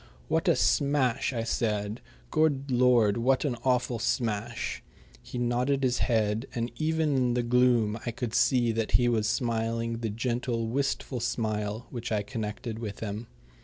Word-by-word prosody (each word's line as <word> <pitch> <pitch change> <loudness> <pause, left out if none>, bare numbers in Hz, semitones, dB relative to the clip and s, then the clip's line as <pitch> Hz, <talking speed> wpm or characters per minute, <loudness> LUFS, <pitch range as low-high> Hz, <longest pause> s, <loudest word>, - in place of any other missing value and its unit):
"What - - +1
a - - +5
smash!" 140 -5 +2
I 115 -3 -2
said. 105 -1 -1 0.3
"Good 140 -3 +1
Lord, 120 -4 +4
what 130 +5 +2
an 130 -4 0
awful 125 -2 +1
smash!" 115 0 -2 0.4
He - - -8
nodded 125 +3 +1
his 125 -2 +1
head, 110 0 +1
and 120 0 -2
even 160 -2 +1
in 125 -2 +2
the 120 - +1
gloom 120 -3 +3
I - - -2
could 120 0 -4
see 120 -3 +3
that 115 -1 -2
he 120 - +5
was 110 -3 +1
smiling 115 -1 -1
the 115 -2 -2
gentle, 120 +1 -1
wistful 130 +1 -1
smile 110 -1 -2
which 120 -2 -5
I 105 -2 +1
connected 110 0 -5
with 105 -3 -6
him. 110 +1 -4
120 Hz, 160 wpm, -28 LUFS, 110-125 Hz, 0.4 s, a